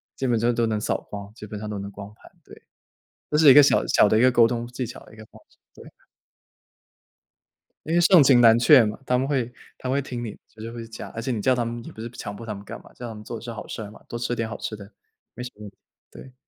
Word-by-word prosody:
基 135 Hz, -, -2 dB
本 120 Hz, -2 st, +2 dB
就 115 Hz, +2 st, +2 dB
都 115 Hz, 0 st, +1 dB
能 110 Hz, -1 st, -1 dB
扫 105 Hz, -, -1 dB
光， 100 Hz, 0 st, -8 dB
基 110 Hz, -, -10 dB
本 105 Hz, 0 st, -7 dB
上 105 Hz, -, -6 dB
都 105 Hz, -1 st, -4 dB
能 100 Hz, 0 st, -6 dB
光 100 Hz, +1 st, -10 dB
盘， -, -, -19 dB
对。 -, -, -16 dB, 0.7 s
这 150 Hz, -, +1 dB
是 155 Hz, -2 st, +7 dB
一 -, -, +10 dB
个 145 Hz, -, +9 dB
小 140 Hz, -, +3 dB
小 105 Hz, -, +4 dB
的 110 Hz, -, +3 dB
一 -, -, +3 dB
个 130 Hz, -, +6 dB
沟 120 Hz, -2 st, +5 dB
通 120 Hz, 0 st, -3 dB
技 125 Hz, +1 st, -5 dB
巧 120 Hz, -, -9 dB
的 -, -, -17 dB
一 -, -, -16 dB
个 110 Hz, -, -11 dB
方 -, -, -19 dB
式。 -, -, -29 dB, 0.2 s
对。 -, -, -14 dB, 1.9 s
因 160 Hz, -, -2 dB
为 175 Hz, -, +4 dB
盛 175 Hz, 0 st, +7 dB
情 130 Hz, -3 st, +5 dB
难 115 Hz, -1 st, +7 dB
却 130 Hz, 0 st, +7 dB
嘛， 105 Hz, 0 st, -3 dB
他 125 Hz, -, +1 dB
们 130 Hz, +2 st, -1 dB
会 130 Hz, -4 st, -1 dB, 0.3 s
他 130 Hz, -, -6 dB
们 135 Hz, -, +1 dB
会 -, -, +1 dB
听 125 Hz, -3 st, -6 dB
你， 110 Hz, -, -7 dB
就 110 Hz, -, -16 dB
是 115 Hz, +1 st, -6 dB
会 115 Hz, -1 st, -7 dB
讲。 110 Hz, -, -9 dB
而 115 Hz, -, -6 dB
且 130 Hz, -, -3 dB
你 110 Hz, -4 st, -2 dB
叫 130 Hz, +4 st, +3 dB
他 120 Hz, -, 0 dB
们 115 Hz, 0 st, -5 dB
也 -, -, -9 dB
不 110 Hz, -, -10 dB
是 115 Hz, -, -6 dB
强 105 Hz, -4 st, -7 dB
迫 115 Hz, -, -9 dB
他 110 Hz, -, -4 dB
们 100 Hz, 0 st, -10 dB
干 -, -, -9 dB
嘛， -, -, -18 dB
叫 120 Hz, -, -8 dB
他 115 Hz, -, -7 dB
们 105 Hz, -, -10 dB
做 115 Hz, -, -6 dB
的 -, -, -11 dB
是 120 Hz, -, -7 dB
好 110 Hz, -2 st, -8 dB
事 -, -, -6 dB
儿 105 Hz, -1 st, -8 dB
嘛， -, -, -16 dB
多 120 Hz, -, -5 dB
吃 120 Hz, 0 st, -2 dB
点 115 Hz, -1 st, -2 dB
好 115 Hz, -, -6 dB
吃 110 Hz, -, -5 dB
的， 100 Hz, 0 st, -12 dB, 0.4 s
没 125 Hz, -, -6 dB
什 125 Hz, -, -7 dB
么 105 Hz, -, -13 dB
问 105 Hz, -, -8 dB
题， 100 Hz, -, -31 dB, 0.3 s
对。 130 Hz, -, -13 dB
115 Hz, 330 characters per minute, -24 LUFS, 110-125 Hz, 1.9 s, 一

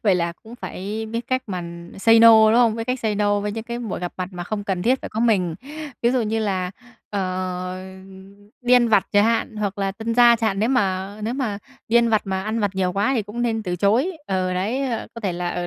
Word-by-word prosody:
Vậy 200 Hz, -4 st, +4 dB
là 170 Hz, -1 st, 0 dB
cũng 230 Hz, +2 st, -12 dB
phải 215 Hz, +2 st, -5 dB
biết 230 Hz, +2 st, -4 dB
cách 255 Hz, 0 st, 0 dB
mà 185 Hz, -3 st, -4 dB, 0.4 s
say 225 Hz, +3 st, +5 dB
no, 230 Hz, 0 st, +9 dB, 0.2 s
đúng -, -, +3 dB
không? 230 Hz, -2 st, +4 dB
Biết 225 Hz, -, -3 dB
cách 255 Hz, 0 st, -1 dB
say 215 Hz, -2 st, 0 dB
no 205 Hz, 0 st, +1 dB
với 205 Hz, 0 st, -3 dB
những 225 Hz, +1 st, -5 dB
cái 235 Hz, 0 st, -5 dB
buổi 230 Hz, -5 st, -4 dB
gặp 175 Hz, -1 st, -4 dB
mặt 185 Hz, -1 st, -3 dB
mà 175 Hz, -1 st, -6 dB
không 205 Hz, +1 st, -4 dB
cần 190 Hz, -3 st, -2 dB
thiết 255 Hz, +5 st, +2 dB
phải -, -, -5 dB
có 220 Hz, -, -3 dB
mình. 195 Hz, -8 st, +2 dB, 0.5 s
Ví 235 Hz, -, +4 dB
dụ 255 Hz, -2 st, +1 dB
như 220 Hz, +1 st, -1 dB
là, 190 Hz, -4 st, -1 dB, 0.4 s
ờ, 185 Hz, -2 st, -3 dB, 0.9 s
đi 245 Hz, +1 st, +4 dB
ăn 240 Hz, -1 st, +5 dB
vặt 210 Hz, -3 st, +3 dB
chẳng 205 Hz, +1 st, +5 dB
hạn 230 Hz, -1 st, 0 dB
hoặc 200 Hz, -1 st, -3 dB
là 195 Hz, -1 st, -1 dB
tân 225 Hz, +2 st, -3 dB
gia 240 Hz, -1 st, +7 dB
chẳng 225 Hz, -1 st, +1 dB
hạn, 195 Hz, -2 st, -2 dB
nếu 220 Hz, +3 st, +1 dB
mà 195 Hz, -5 st, 0 dB
nếu 225 Hz, +3 st, -2 dB
mà 235 Hz, -7 st, -2 dB, 0.3 s
đi 230 Hz, -, +3 dB
ăn 235 Hz, 0 st, +4 dB
vặt 215 Hz, -2 st, +2 dB
mà 190 Hz, -1 st, -2 dB
ăn 220 Hz, +2 st, -2 dB
vặt 205 Hz, -, +1 dB
nhiều 185 Hz, -1 st, 0 dB
quá 205 Hz, +7 st, +1 dB
thì 230 Hz, -, +1 dB
cũng 220 Hz, +4 st, -5 dB
nên 225 Hz, -2 st, 0 dB
từ 180 Hz, -3 st, -3 dB
chối. 230 Hz, -, +2 dB
Ừ, 185 Hz, -1 st, -1 dB
đấy, 210 Hz, +9 st, -1 dB, 0.3 s
có 230 Hz, -, -7 dB
thể 195 Hz, -5 st, -1 dB
là, 175 Hz, 0 st, -3 dB
ờ, 175 Hz, 0 st, -3 dB
210 Hz, 255 wpm, -22 LUFS, 190-230 Hz, 0.9 s, no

